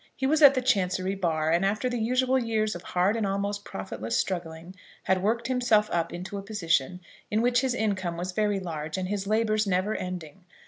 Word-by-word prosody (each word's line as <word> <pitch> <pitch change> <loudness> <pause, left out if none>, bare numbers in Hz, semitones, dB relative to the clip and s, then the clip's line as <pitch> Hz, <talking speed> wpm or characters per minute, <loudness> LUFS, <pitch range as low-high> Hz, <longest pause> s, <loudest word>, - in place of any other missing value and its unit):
He 265 - -2
was 310 +3 +2
at 280 -2 +9
the 255 - 0
Chancery 190 -5 +1
bar, 160 -5 0
and 170 +3 +2
after 210 +6 0
the 245 -1 -2
usual 255 +3 +2
years 220 -3 0
of 175 - -7
hard 185 +4 +1
and 225 - -1
almost 200 +1 -2
profitless 110 - -4
struggling, 170 -1 -4 0.3
had 190 -1 +1
worked 230 +4 0
himself 245 -4 +2
up 170 -1 0
into 185 +3 -6
a - - -6
position 180 -5 -1 0.3
in 215 +2 +1
which 245 0 +3
his 260 -2 0
income 190 -7 -1
was 180 +2 -3
very 205 +1 0
large, 160 -3 -5
and 185 0 -3
his 200 -1 -2
labours 215 0 +1
never 190 +3 +1
ending. 180 -3 -6
195 Hz, 200 wpm, -27 LUFS, 180-220 Hz, 0.3 s, at